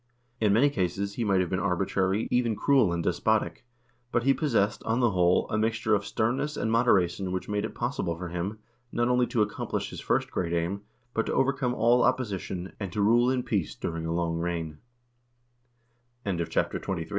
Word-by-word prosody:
In 105 Hz, -2 st, +3 dB
many 130 Hz, +8 st, +4 dB
cases 100 Hz, -2 st, -1 dB
he 120 Hz, -, -2 dB
might 100 Hz, -3 st, +2 dB
have 90 Hz, -, -1 dB
been 95 Hz, -, 0 dB
arbitrary, 95 Hz, +3 st, 0 dB
even 120 Hz, -3 st, +2 dB
cruel 130 Hz, -6 st, +3 dB
and 85 Hz, -1 st, -1 dB
despotic, 110 Hz, +7 st, 0 dB, 0.4 s
but 120 Hz, -, +1 dB
he 135 Hz, +2 st, +4 dB
possessed, 115 Hz, -9 st, +1 dB
on 115 Hz, +2 st, 0 dB
the 120 Hz, -3 st, +3 dB
whole, 90 Hz, -1 st, +3 dB
a 110 Hz, -, +1 dB
mixture 110 Hz, 0 st, +1 dB
of 100 Hz, -1 st, +1 dB
sternness 135 Hz, +7 st, -1 dB
and 110 Hz, -, -1 dB
moderation 95 Hz, -6 st, +2 dB
which 95 Hz, 0 st, -3 dB
made 105 Hz, 0 st, -1 dB
it -, -, -7 dB
possible 120 Hz, -9 st, -2 dB
for 90 Hz, 0 st, -5 dB
him, 90 Hz, +5 st, -3 dB, 0.3 s
not 120 Hz, +1 st, +1 dB
only 125 Hz, 0 st, +3 dB
to 110 Hz, -, +2 dB
accomplish 105 Hz, 0 st, -3 dB
his -, -, -7 dB
first -, -, 0 dB
great 85 Hz, -2 st, -2 dB
aim, 85 Hz, +4 st, -1 dB, 0.3 s
but 115 Hz, -, 0 dB
to -, -, -1 dB
overcome 135 Hz, -2 st, +1 dB
all 120 Hz, +2 st, +4 dB
opposition, 95 Hz, -6 st, -1 dB
and 100 Hz, -4 st, -4 dB
to 105 Hz, -, -4 dB
rule 120 Hz, +4 st, +4 dB
in 130 Hz, -1 st, 0 dB
peace 100 Hz, -9 st, -1 dB
durin 85 Hz, -1 st, -2 dB
105 Hz, 170 wpm, -27 LUFS, 90-120 Hz, 0.4 s, many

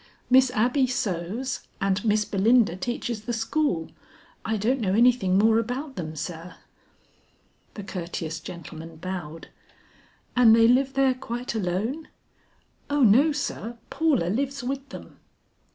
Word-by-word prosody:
"Miss 260 Hz, 0 st, +6 dB
Abby 250 Hz, +4 st, +2 dB
sews 225 Hz, +3 st, -2 dB, 0.2 s
and 195 Hz, 0 st, 0 dB
Miss 215 Hz, -1 st, +2 dB
Belinda 210 Hz, -1 st, +3 dB
teaches 220 Hz, +2 st, -4 dB
the 240 Hz, -, -2 dB
school. 225 Hz, -, -1 dB, 0.5 s
I 220 Hz, 0 st, -1 dB
don't 240 Hz, +6 st, 0 dB
know 195 Hz, -2 st, +1 dB
anything 235 Hz, -5 st, +4 dB
more 220 Hz, +2 st, +4 dB
about 260 Hz, +5 st, -4 dB
them, 155 Hz, -4 st, -5 dB
sir." 170 Hz, +2 st, -6 dB, 1.2 s
The 205 Hz, -, -7 dB
courteous 170 Hz, -4 st, -5 dB
gentleman 165 Hz, 0 st, -9 dB
bowed. 165 Hz, -2 st, -7 dB, 0.9 s
"And 235 Hz, -3 st, +7 dB
they 230 Hz, 0 st, +5 dB
live 265 Hz, +3 st, +3 dB
there 270 Hz, -1 st, +3 dB
quite 245 Hz, -1 st, -5 dB
alone?" 220 Hz, -, -2 dB, 0.8 s
"O 290 Hz, 0 st, +1 dB
no 255 Hz, +8 st, +5 dB
sir, 240 Hz, -5 st, -4 dB
Paula 310 Hz, -, +1 dB
lives 275 Hz, +5 st, -2 dB
with 275 Hz, +2 st, -4 dB
them." -, -, -11 dB
225 Hz, 130 wpm, -25 LUFS, 185-255 Hz, 1.2 s, And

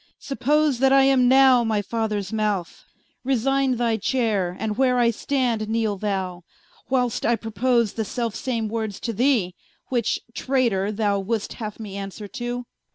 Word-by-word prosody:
Suppose 290 Hz, 0 st, +1 dB
that 265 Hz, 0 st, +4 dB
I 270 Hz, 0 st, +6 dB
am 265 Hz, -2 st, +4 dB
now 260 Hz, -1 st, +6 dB
my 215 Hz, -2 st, 0 dB
Fathers 215 Hz, -2 st, -2 dB
Mouth, 210 Hz, -5 st, -2 dB, 0.4 s
Resigne 270 Hz, +1 st, +1 dB
thy 230 Hz, -2 st, 0 dB
Chayre, 210 Hz, -6 st, 0 dB
and 215 Hz, -1 st, -2 dB
where 250 Hz, 0 st, +2 dB
I 235 Hz, -1 st, +4 dB
stand, 235 Hz, -3 st, -1 dB
kneele 220 Hz, -2 st, 0 dB
thou, 190 Hz, -3 st, -2 dB, 0.5 s
Whil'st 250 Hz, -3 st, 0 dB
I 235 Hz, -, +3 dB
propose 230 Hz, +1 st, 0 dB
the 225 Hz, -, -2 dB
selfe 230 Hz, +1 st, -3 dB
same 230 Hz, -4 st, -2 dB
words 220 Hz, -2 st, -3 dB
to 230 Hz, -, -3 dB
thee, 225 Hz, -6 st, +2 dB, 0.4 s
Which 240 Hz, -4 st, 0 dB
(Traytor) 235 Hz, -8 st, 0 dB
thou 205 Hz, -2 st, 0 dB
would'st 210 Hz, +2 st, -2 dB
haue 215 Hz, -2 st, -6 dB
me 200 Hz, -3 st, -7 dB
answer 200 Hz, +1 st, -6 dB
to 245 Hz, +2 st, -4 dB
Qu. -, -, -33 dB
230 Hz, 160 wpm, -23 LUFS, 210-255 Hz, 0.5 s, I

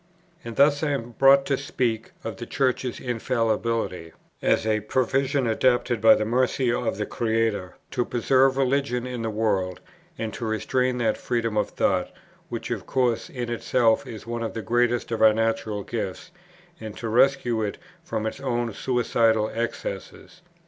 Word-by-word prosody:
And 115 Hz, -1 st, -7 dB
thus 145 Hz, +1 st, +4 dB
I 155 Hz, -, 0 dB
am 120 Hz, -3 st, -4 dB
brought 135 Hz, +3 st, +5 dB
to 140 Hz, -, +1 dB
speak 120 Hz, -5 st, -2 dB
of 110 Hz, -3 st, -5 dB
the 120 Hz, -, -7 dB
Church's 130 Hz, -2 st, -1 dB
infallibility, 115 Hz, -7 st, -1 dB, 0.3 s
as -, -, +2 dB
a 110 Hz, -1 st, +2 dB
provision, 130 Hz, +5 st, 0 dB
adapted 120 Hz, 0 st, +1 dB
by 110 Hz, 0 st, +8 dB
the 110 Hz, -, -1 dB
mercy 125 Hz, +1 st, +1 dB
of 110 Hz, -5 st, -1 dB
the 105 Hz, -, -2 dB
Creator, 110 Hz, -5 st, -1 dB, 0.2 s
to 125 Hz, -, 0 dB
preserve 130 Hz, +2 st, +2 dB
religion 135 Hz, -2 st, +1 dB
in 125 Hz, -2 st, -4 dB
the 115 Hz, -, -2 dB
world, 100 Hz, -4 st, 0 dB, 0.4 s
and 110 Hz, -3 st, -4 dB
to -, -, -6 dB
restrain 125 Hz, +3 st, 0 dB
that 115 Hz, -3 st, 0 dB
freedom 115 Hz, -3 st, -1 dB
of 105 Hz, -, +1 dB
thought, -, -, 0 dB, 0.4 s
which -, -, -5 dB
of -, -, -4 dB
course 125 Hz, -3 st, 0 dB
in 120 Hz, -2 st, -4 dB
itself 120 Hz, -1 st, +2 dB
is 110 Hz, -2 st, -8 dB
one 120 Hz, 0 st, -4 dB
of 115 Hz, 0 st, -4 dB
the 115 Hz, -, -4 dB
greatest 120 Hz, +3 st, +1 dB
of 115 Hz, -, -2 dB
our 110 Hz, -1 st, +7 dB
natural 110 Hz, -2 st, -1 dB
gifts, 110 Hz, -, -5 dB, 0.5 s
and 110 Hz, -4 st, -8 dB
to 115 Hz, -, -4 dB
rescue 120 Hz, 0 st, +3 dB
it 105 Hz, -2 st, -2 dB, 0.3 s
from 110 Hz, -, -3 dB
its 110 Hz, -, -4 dB
own 120 Hz, -4 st, -1 dB
suicidal 115 Hz, -3 st, +1 dB
excesses. 115 Hz, -, -5 dB
115 Hz, 165 wpm, -25 LUFS, 110-125 Hz, 0.5 s, by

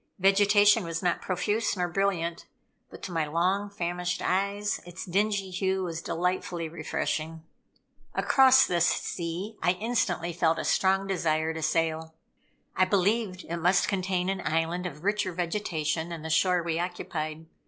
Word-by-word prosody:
Vegetation 205 Hz, +2 st, +5 dB
was 165 Hz, 0 st, -4 dB
not 175 Hz, -, +1 dB
profuse 205 Hz, +4 st, -1 dB
nor 180 Hz, -1 st, 0 dB
brilliant, 175 Hz, -2 st, -1 dB, 0.4 s
but -, -, -13 dB
to 190 Hz, -, -5 dB
my 160 Hz, -3 st, -1 dB
long 185 Hz, +6 st, 0 dB
famished 180 Hz, -2 st, -3 dB
eyes, 200 Hz, +2 st, -1 dB
its 175 Hz, +1 st, -8 dB
dingy 195 Hz, +1 st, 0 dB
hue 190 Hz, +1 st, 0 dB
was 165 Hz, -2 st, -4 dB
delightfully 175 Hz, -1 st, -2 dB
refreshing. 160 Hz, 0 st, -3 dB, 0.7 s
Across 265 Hz, 0 st, +6 dB
this 170 Hz, -1 st, +2 dB
sea 180 Hz, +7 st, -3 dB
I 180 Hz, -, +3 dB
instantly 180 Hz, -5 st, -1 dB
felt 165 Hz, -1 st, +2 dB
a -, -, -3 dB
strong 190 Hz, +1 st, +2 dB
desire 160 Hz, -4 st, 0 dB
to 160 Hz, -, -5 dB
sail. 160 Hz, 0 st, -1 dB, 0.6 s
I 185 Hz, -, +4 dB
believed 195 Hz, 0 st, +1 dB
it 170 Hz, -, -4 dB
must 180 Hz, +3 st, +3 dB
contain 185 Hz, -2 st, -1 dB
an 195 Hz, -1 st, -2 dB
island 165 Hz, +3 st, -1 dB
of 150 Hz, -1 st, -10 dB
richer 205 Hz, -2 st, 0 dB
vegetation 165 Hz, -3 st, -2 dB
than 165 Hz, -2 st, -6 dB
the 160 Hz, -, -4 dB
shore 180 Hz, +1 st, +3 dB
we 165 Hz, -1 st, -1 dB
occupied. 160 Hz, -3 st, -4 dB
180 Hz, 150 wpm, -28 LUFS, 165-195 Hz, 0.7 s, Across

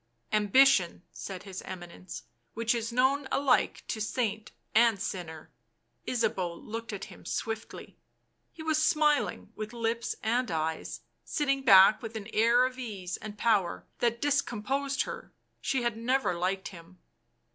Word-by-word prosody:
" -, -, -44 dB
Ambition," 205 Hz, -5 st, +4 dB
said 190 Hz, -2 st, -7 dB
his 190 Hz, -2 st, -7 dB
Eminence, 175 Hz, -1 st, -8 dB
" 115 Hz, -1 st, -46 dB
which 230 Hz, +1 st, +1 dB
is 230 Hz, -1 st, -2 dB
known 265 Hz, +3 st, +2 dB
alike 275 Hz, -2 st, +2 dB
to 220 Hz, -, -3 dB
saint 220 Hz, -1 st, -2 dB, 0.2 s
and 230 Hz, -2 st, +5 dB
sinner." 170 Hz, -5 st, -5 dB, 0.6 s
Ysabeau 200 Hz, -8 st, 0 dB
looked 225 Hz, +6 st, -6 dB
at 200 Hz, -2 st, -5 dB
him 195 Hz, -4 st, -14 dB
swiftly; 225 Hz, 0 st, -5 dB, 0.5 s
he 315 Hz, -, -10 dB
was 310 Hz, -1 st, +2 dB
smiling 300 Hz, -3 st, +2 dB
with 215 Hz, +1 st, -6 dB
lips 230 Hz, 0 st, -1 dB
and 240 Hz, +3 st, +1 dB
eyes, 160 Hz, -1 st, -3 dB, 0.2 s
sitting 275 Hz, -3 st, 0 dB
back 195 Hz, -4 st, +7 dB
with 225 Hz, -1 st, -7 dB
an 215 Hz, 0 st, -6 dB
air 235 Hz, +3 st, +5 dB
of 255 Hz, 0 st, -4 dB
ease 195 Hz, -7 st, -5 dB
and 215 Hz, -1 st, -8 dB
power 205 Hz, -5 st, +1 dB
that 235 Hz, -1 st, +1 dB
discomposed 275 Hz, 0 st, 0 dB
her; -, -, -8 dB, 0.3 s
she 265 Hz, -3 st, 0 dB
had 235 Hz, -2 st, 0 dB
never 250 Hz, -2 st, +1 dB
liked 185 Hz, +2 st, -2 dB
him. 170 Hz, 0 st, -14 dB
225 Hz, 145 wpm, -29 LUFS, 190-255 Hz, 0.6 s, back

